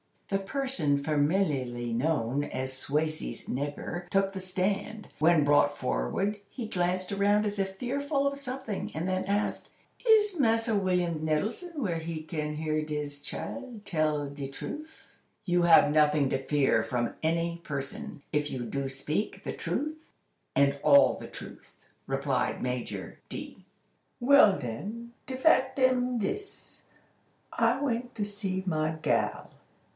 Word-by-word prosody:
The 195 - +1
person 195 - 0
familiarly 145 -5 0
known 140 0 0
as 130 0 -3
"Swasey's 150 -1 -1
nigger" 145 +6 -4
took 195 0 +2
the 195 - -5
stand. 195 +3 -2
When 160 -1 +5
brought 145 0 +4
forward, 65 - -1
he 235 -1 -5
glanced 180 0 0
around 205 +1 +3
as 205 -1 -2
if 195 0 -1
fearful 280 +5 -1
of 280 0 0
something, 255 -6 -4
and 160 +3 -2
then 185 0 0
asked: 200 +2 -1 0.4
"Is 420 -5 +5
Massa 230 -2 +3
William 180 -4 +1
Nettletum 200 - -1
where 185 -10 0
he 160 -1 -5
can 150 -2 -3
hear 155 0 0
dis 150 -2 -3
chile 240 - -6
tell 155 -3 0
de 140 -1 -6
truff?" 305 - -8 0.4
"You 175 -1 +2
have 165 -3 +7
nothing 150 -2 +4
to 135 - 0
fear 140 -6 +3
from 120 +1 -1
any 170 +1 0
person, 140 0 -5
if 150 0 0
you 125 - -4
do 135 +4 -2
speak 140 +8 -3
the - - -3
truth, 310 +2 -4 0.4
and 140 0 +3
all 280 0 +7
the - - -8
truth," - - -11 0.3
replied - - 0
Major - - -4
D. - - -8 0.6
"Well 250 -6 +7
den, 205 - -6 0.2
de 260 - -3
fact 265 -1 +3
am 255 -1 +3
dis. 395 - -5 0.7
I 230 +3 +2
went 245 -3 -2
to 210 - -1
see 200 -2 -3
my 155 -3 +1
gal. - - 0
175 Hz, 140 wpm, -29 LUFS, 150-230 Hz, 0.7 s, have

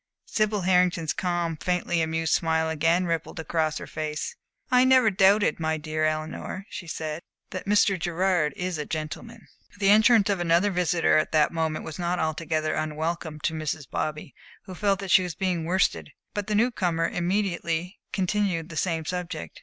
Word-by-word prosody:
Sibyl 215 -3 0
Hartington's 180 -3 +2
calm, 175 -3 -1
faintly 180 0 0
amused 160 0 0
smile 160 0 +1
again 165 +3 +2
rippled 165 -1 -3
across 160 0 -1
her - - -6
face. 155 - -4 0.4
"I 250 0 +6
never 260 -4 +5
doubted, 195 +1 +4
my 160 -1 0
dear 155 0 -2
Eleanor," 155 +5 -3
she 175 - -7
said, 160 0 -4 0.3
"that 185 - -6
Mr. 200 -2 +3
Gerard 175 -2 +1
is 180 -3 -3
a 150 - -3
gentleman." 165 +9 -6 0.3
The 200 -1 +4
entrance 220 0 +6
of 195 - 0
another 175 +4 +3
visitor 175 -3 +2
at 155 - -2
that 155 -1 +4
moment 160 -1 -2
was 160 - -7
not 175 +1 0
altogether 155 -1 -1
unwelcome 155 0 -3
to 160 - 0
Mrs. 155 -2 -4
Bobby, 150 -2 -4 0.3
who 185 - -9
felt 200 +1 +1
that 195 -2 -4
she 190 - +7
was 180 -2 -4
being 180 -4 -1
worsted; 185 +3 +1 0.2
but 205 -1 -3
the 210 - 0
new 235 +4 +3
comer 165 -6 0
immediately 180 -1 -2
continued 185 -3 0
the 165 - -7
same 165 -2 -1
subject. 175 - -5
170 Hz, 170 wpm, -26 LUFS, 160-190 Hz, 0.4 s, she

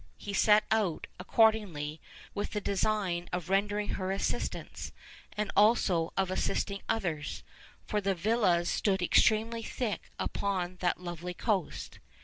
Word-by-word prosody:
He 200 - -6
set 210 +2 +5
out, 210 -7 +1
accordingly, 180 -8 +2 0.3
with 205 - -3
the 210 - 0
design 195 -3 0
of 180 0 -3
rendering 205 +1 +1
her 185 -1 -2
assistance, 195 - -3 0.5
and 210 0 -1
also 195 -6 +4
of 190 -1 +1
assisting 200 +1 -1
others, 175 -10 -2 0.4
'for 210 - -1
the 195 -1 +1
villas 180 -3 +2
stood 190 -2 +1
extremely 225 +5 +3
thick 225 -1 -3
upon 185 -3 -2
that 175 -1 0
lovely 175 0 -6
coast. 200 -6 -2
195 Hz, 125 wpm, -31 LUFS, 175-210 Hz, 0.5 s, set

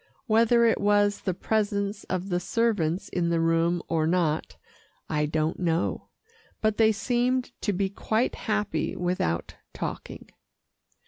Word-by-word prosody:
Whether 230 0 +4
it 225 - +2
was 205 0 +3
the 185 - -1
presence 205 -1 -1
of 185 +1 -3
the 175 -1 +1
servants 190 -4 0
in 170 -2 0
the 170 -1 +1
room 165 +1 +2
or 160 -1 +1
not, 165 -3 0 0.5
I 150 -1 0
don't 155 +1 -1
know, 170 -1 -1 0.5
but 215 -1 +1
they 220 -1 +5
seemed 245 +4 0
to 205 - 0
be 195 0 0
quite 220 +4 -1
happy 210 -2 -2
without 175 - -2 0.2
talking. - - -6
195 Hz, 135 wpm, -26 LUFS, 170-220 Hz, 0.5 s, they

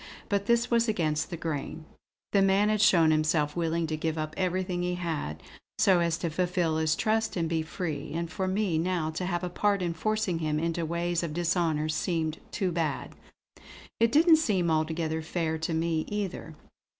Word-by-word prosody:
But 200 0 0
this 235 +1 +2
was 235 0 +3
against 160 -8 0
the 170 - -5
grain. 155 0 -4 0.5
The 200 - +4
man 195 +2 +3
had 215 -1 +1
shown 165 -6 +5
himself 155 -1 +1
willing 165 -1 0
to 155 -1 -2
give 160 +1 -2
up 155 0 -3
everything 185 -1 -1
he 180 0 -1
had, 160 - -4 0.3
so 185 -2 +4
as 170 -1 +1
to 170 -1 -3
fulfill 175 -1 0
his 160 0 +2
trust 220 +2 0
and 165 -1 0
be 165 0 0
free; 155 -2 -4
and 170 0 -2
for 185 +4 -3
me 185 -4 0
now 170 -2 -1
to 180 +3 -3
have 175 -1 -2
a - - -1
part 200 +2 0
in 170 -1 -1
forcing 215 -1 -1
him 155 -2 -1
into 165 0 -1
ways 170 +1 -1
of 160 -3 -4
dishonour 170 -3 +1
seemed 160 0 -1
too 190 -4 -1
bad. 160 -4 -2 0.9
It 230 0 +4
didn't 320 +4 +6
seem 190 - +1
altogether 160 0 0
fair 160 0 -2
to 160 +1 -2
me 160 -1 0
either. 195 -6 -4
170 Hz, 185 wpm, -28 LUFS, 160-185 Hz, 0.9 s, didn't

